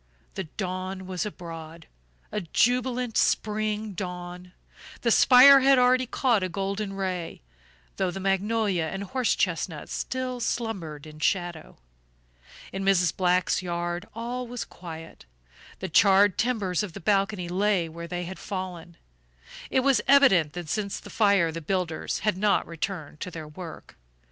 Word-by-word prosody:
The 190 - -4
dawn 185 +2 -5
was 185 +1 -3
abroad, 165 -4 -9 0.5
a 210 - -2
jubilant 245 +5 +1
spring 215 0 0
dawn; 180 -1 -6 0.5
the 235 - +2
spire 265 +4 +8
had 270 0 +5
already 255 0 +4
caught 240 -4 +1
a 185 - -1
golden 195 +2 -3
ray, 185 - -4 0.5
though 190 - +1
the 180 - -5
magnolia 195 -1 0
and 195 +5 -4
horse 250 +3 0
chestnut 165 -3 -2
still 255 -1 -3
slumbered 195 -12 -3
in 155 0 -12
shadow. 175 -2 -2 1.0
In 195 0 -3
Mrs. 180 -4 +3
Black's 180 0 +2
yard 175 +1 -3
all 245 +2 -4
was 245 0 -5
quiet. 165 - -10 0.6
The - - -2
charred 200 -1 +5
timbers 215 -8 0
of 205 -5 -5
the 200 - -7
balcony 195 0 0
lay 190 -1 +1
where 170 +1 -8
they 175 0 -4
had 185 +2 -7
fallen. 180 -4 -6 0.7
It 260 - +2
was 260 -4 +3
evident 195 - +5
that 175 -2 -6
since 200 +4 -2
the - - -12
fire 200 -6 +3
the 165 +1 -6
builders 170 -1 -2
had 210 -3 0
not 205 0 +2
returned 165 -2 -5
to - - -5
their 160 -3 -8
work. 165 +2 -10
190 Hz, 145 wpm, -26 LUFS, 175-215 Hz, 1.0 s, spire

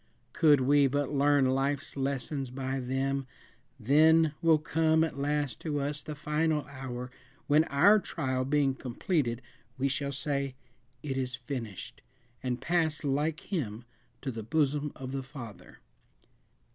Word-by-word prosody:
Could 150 -4 +5
we 140 +2 +5
but 145 +1 -1
learn 145 -1 +4
life's 135 +2 -1
lessons 135 0 -2
by 135 +1 -3
them, 135 +1 -1 0.5
then 155 +5 +5
will 165 -2 +5
come 160 +1 +2
at 155 -4 -3
last 145 -1 -1
to 150 -3 -2
us 145 +1 -1
the 150 - -6
final 150 -1 0
hour, 125 -2 -7 0.3
when, 150 +2 +4
our 185 +11 +5
trial 130 -8 -2
being 140 0 +2
completed, 130 - -2 0.3
we 135 +1 +1
shall 140 +1 -2
say 140 -1 -2 0.5
"It 135 -3 -3
is 130 -1 -1
finished," 120 -6 -6 0.4
and 125 -2 -2
pass 160 -3 0
like 150 +2 0
him 120 - -3 0.4
to 135 - -2
the 115 -2 -5
bosom 145 +3 0
of 130 -1 -7
the 135 0 -2
Father. 130 -5 -11
140 Hz, 140 wpm, -30 LUFS, 130-150 Hz, 0.5 s, Could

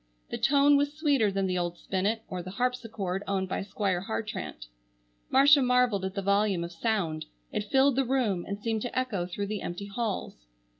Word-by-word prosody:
The - - -2
tone 285 +1 +5
was 285 0 +1
sweeter 285 -9 +2
than 195 0 0
the 185 -1 0
old 175 0 -2
spinet, 205 +6 -1
or 180 -1 -4
the 180 - -8
harpsichord 220 -4 -2
owned 190 -1 0
by - - -2
Squire 195 -2 -1
Hartrandt. 80 - -4 0.6
Marcia 280 +2 +6
marvelled 250 -6 +2
at 190 +1 -4
the 200 - -2
volume 200 -2 +2
of 170 - -6
sound. 170 -4 -1 0.3
It 205 0 -3
filled 270 0 +4
the 270 - +4
room 235 -9 0
and 200 - -3
seemed 220 0 -1
to 245 +2 -4
echo 205 -9 -2
through 200 +3 -3
the 210 0 -4
empty 175 +3 -5
halls. 200 - -4
205 Hz, 190 wpm, -28 LUFS, 185-250 Hz, 0.6 s, Marcia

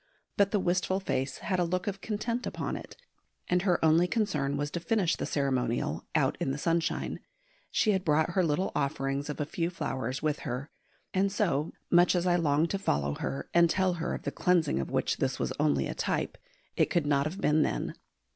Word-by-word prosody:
But 200 -1 +4
the 205 - +1
wistful 185 +1 +1
face 135 -7 -2
had 185 -2 -1
a - - +3
look 180 +1 -1
of 195 -1 -3
content 230 +3 -2
upon - - -3
it, - - -9 0.5
and 180 0 +2
her 180 -2 +3
only 165 +3 +5
concern 150 - 0
was 145 0 -2
to 170 - -2
finish 175 0 +1
the - - -3
ceremonial 125 - -1
out - - +2
in - - -1
the 135 - -1
sunshine 165 +2 -1 0.5
she 215 - +2
had 190 -2 0
brought 155 0 +2
her 185 +1 +2
little 170 +4 0
offerings 140 +1 -1
of 150 - -4
a 150 - 0
few 165 +3 -2
flowers 130 -6 -3
with 150 -1 0
her 125 +5 -5 0.4
and 195 +1 +2
so, 170 -8 0 0.2
much 175 +1 +5
as 175 0 +1
I 175 -1 +3
longed 160 -1 +2
to 195 - -1
follow 70 - 0
her 70 +1 -4
and 170 0 +5
tell 185 +1 +2
her 170 - -1
of - - -8
the - - -2
cleansing 170 - +2
of 70 - -3
which - - 0
this - - -1
was - - -2
only 70 -3 +2
a - - -3
type, - - -1 0.4
it - - +2
could 170 -4 +1
not 145 0 +2
have 180 +6 -6
been 155 -5 +3
then. - - -1
165 Hz, 210 wpm, -29 LUFS, 140-185 Hz, 0.5 s, only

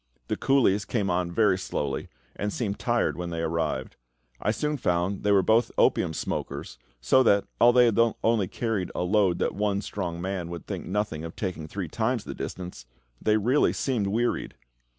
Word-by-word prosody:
The - - +1
coolies 120 -7 +3
came 100 -3 -1
on 90 0 0
very 100 -1 +3
slowly, 70 -6 -3 0.3
and 105 0 -2
seemed 100 -4 -3
tired 120 -1 +1
when 90 -1 -4
they 85 -1 -3
arrived. 80 -5 -2 0.4
I - - 0
soon 150 +7 0
found 90 -3 0
that - - -14
they 105 - +2
were 100 -2 +5
both 115 +4 +3
opium 80 - +3
smokers, 70 -4 -4 0.2
so 95 - +4
that, 100 -5 +4
although 120 0 +6
they 115 - +3
had 115 - 0
only 110 -4 +2
carried 110 -3 -2
a - - 0
load 95 -1 +2
that - - 0
one 100 0 0
strong 90 -5 -4
man 90 -1 -3
would 85 -3 -7
think - - -5
nothing 95 -5 -2
of 80 - -7
taking 90 -6 -4
three 95 +2 -4
times 115 +6 -1
the - - -6
distance, 90 -10 -7 0.3
they 110 0 +3
really 125 +7 +3
seemed 120 -7 -1
wearied. 115 +4 -1
100 Hz, 190 wpm, -27 LUFS, 85-115 Hz, 0.4 s, although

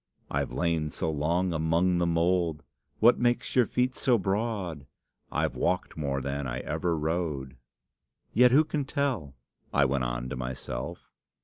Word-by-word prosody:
'I've - - -1
lain 85 -3 0
so 80 +1 -2
long 85 +5 0
among 85 +3 +2
the 85 - +2
mould.' 85 -2 +1 0.3
'What 120 +2 +5
makes 120 0 +1
your 125 -4 +5
feet 125 +1 +1
so 125 -2 +2
broad?' 95 -7 -2 0.4
'I've - - 0
walked 90 - 0
more 70 -3 -2
than 70 +1 -3
ever 80 +7 -1
I - - -3
rode!' 75 -5 -2 0.8
"'Yet 125 +2 +6
who 140 +5 +6
can 150 -2 -2
tell?' 130 - -2 0.4
I 70 -1 +4
went 70 -1 0
on - - -2
to 65 - -4
myself. 60 -1 -5
85 Hz, 150 wpm, -28 LUFS, 70-100 Hz, 0.8 s, Yet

